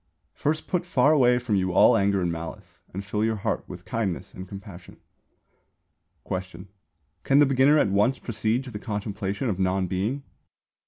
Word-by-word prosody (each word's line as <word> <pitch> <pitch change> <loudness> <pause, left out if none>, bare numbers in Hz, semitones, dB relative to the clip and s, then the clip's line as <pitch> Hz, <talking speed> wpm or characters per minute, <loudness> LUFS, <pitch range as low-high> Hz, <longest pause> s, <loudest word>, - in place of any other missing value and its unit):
_ - - -49 0.3
First 155 +2 -1
put 180 -2 0
far 150 -5 +3
away 125 -4 +4
from 125 -3 -2
you 95 -1 0
all - - +6
anger 100 -1 +2
and 85 - 0
malice, 80 0 -8
and 100 +2 -6
fill 105 +2 -1
your 110 0 +1
heart 100 - -2
with - - -10
kindness 105 -6 -3
and 95 +1 -8
compassion. 95 -2 -11 1.3
Question. 95 0 -6 0.5
Can 135 - +3
the 145 - +7
beginner 135 +2 +4
at 105 - +3
once 105 +7 +2
proceed 115 +1 -1
to 130 - -9
the 105 - -6
contemplation 105 +2 -3
of 100 -5 -2
non 95 0 +1
Being? 100 +10 -2
105 Hz, 175 wpm, -25 LUFS, 95-125 Hz, 1.3 s, the